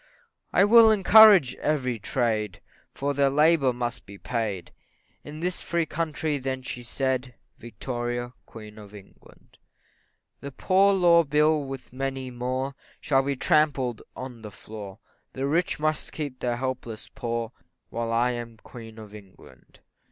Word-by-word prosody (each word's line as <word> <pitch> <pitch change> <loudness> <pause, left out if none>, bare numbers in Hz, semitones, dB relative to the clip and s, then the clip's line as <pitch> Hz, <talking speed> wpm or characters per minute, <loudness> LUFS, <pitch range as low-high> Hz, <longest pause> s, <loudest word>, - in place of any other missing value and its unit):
I - - +4
will 225 +1 +7
encourage 210 - +7
every 130 -6 -1
trade, 110 -4 -1 0.3
For 145 +1 -2
their 140 0 +2
labour 150 -1 +3
must 120 0 -5
be 100 0 -11
paid, 105 -5 -4 0.5
In 150 +2 -9
this 180 0 -1
free 170 -1 -1
country 155 -2 -2
then 130 0 -4
she 125 - -6
said 130 0 -2 0.2
Victoria, 120 +1 -5
Queen 110 -1 -12
of 105 0 -13
England; 100 -2 -18 0.8
That 140 -2 -9
poor 195 +1 +4
law 170 -2 +5
bill, 150 +1 +2
with 135 -2 -8
many 135 -1 -4
more, 130 +2 -3 0.3
Shall 135 -2 +2
be 140 +1 -2
trampled 140 -5 +1
on 125 -3 -8
the 105 - -8
floor 105 -1 -10 0.4
The 135 - -3
rich 165 +4 0
must 155 0 -1
keep 145 -5 -5
the 120 -1 -1
helpless 120 -3 -5
poor. 115 -1 -4 0.4
While 115 0 -3
I 120 +2 +2
am 120 -2 -7
Queen 115 0 -12
of 105 -2 -11
England. 100 -3 -16
130 Hz, 145 wpm, -26 LUFS, 115-150 Hz, 0.8 s, will